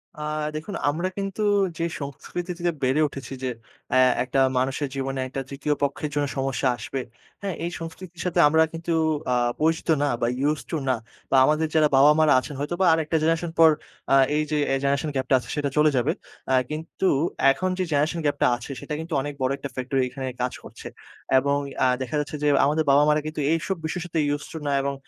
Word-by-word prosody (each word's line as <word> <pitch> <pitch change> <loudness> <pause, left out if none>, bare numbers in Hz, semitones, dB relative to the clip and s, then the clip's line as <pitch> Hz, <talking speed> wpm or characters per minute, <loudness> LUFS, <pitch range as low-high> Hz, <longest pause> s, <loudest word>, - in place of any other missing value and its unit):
আ - - -13 0.4
দেখুন 160 +6 -5
আমরা 170 +5 -1
কিন্তু 195 +1 -3 0.4
যে 165 - -2 0.2
সংস্কৃতি 165 +5 -5
থেকে 175 0 +1
বেড়ে 130 +4 +2
উঠেছি 135 -1 -8
যে 130 - 0 0.4
অ্যা - - +3 0.3
একটা 130 +2 -1 0.2
মানুষের 135 +2 0
জীবনে 135 0 -3
একটা 135 +1 -4
৩য় 140 +2 -1
পক্ষের 140 +1 -1
জন্য 145 - +1
সমস্যা 135 0 0
আসবে। 130 +4 -4 0.4
হ্যাঁ, 195 -3 -3
এই 175 - -3
সংস্কৃতির 170 +1 -8
সাথে 180 - 0
আমরা 160 +2 +4
কিন্তু 165 +1 -3 0.4
আ - - +2 0.3
পরিচিত 160 +1 +1
না 145 - +2
বা 120 - +2 0.2
Used 150 -1 -3
to 160 - 0
না। 130 - +3 0.4
বা 135 - +5
আমাদের 155 +1 +2
যারা 155 -1 +5
বাবা-মারা 150 +2 +6
আছেন 140 +3 -7
হয়তোবা 175 +6 0
আরেকটা 160 0 0
জেনারেশন 165 +1 +1
পর 160 - +9 0.4
আ - - +7 0.2
এই 155 - +2
যে 150 - +1 0.2
এই 135 - +1
জেনারেশন 140 +2 +1
গ্যাপটা 130 0 +2
আছে - - -12
সেটা 145 -2 -1
চলে 150 0 +5
যাবে। 125 +4 +2 0.4
অ্যা 130 - +4
কিন্তু 160 +5 -3 0.4
এখন 185 +7 -1
যে - - +2
জেনারেশন 150 +4 +1
গ্যাপটা 145 0 +2
আছে 120 +3 -8
সেটা - - -6
কিন্তু 160 +1 -6
অনেক 145 +2 -4
বড় 130 +1 +1
একটা 140 0 -6
ফ্যাক্টর 130 +1 -2
এইখানে 130 +1 -5
কাজ 125 0 -1
করছে - - -10 0.5
এবং 140 +2 +2 0.3
আ - - +5
দেখা 130 +4 -3
যাচ্ছে 150 +1 -4
যে - - +3 0.2
আমাদের 155 +2 +2
বাবা-মারা 150 +2 +4
কিন্তু 155 0 -5
এইসব 170 +4 -1
বিষয়ের 160 +2 -3
সাথে 170 -2 -2 0.2
Used 145 - -9
to - - -5
না - - +1
এবং 140 0 -1
150 Hz, 200 wpm, -24 LUFS, 135-160 Hz, 0.5 s, পর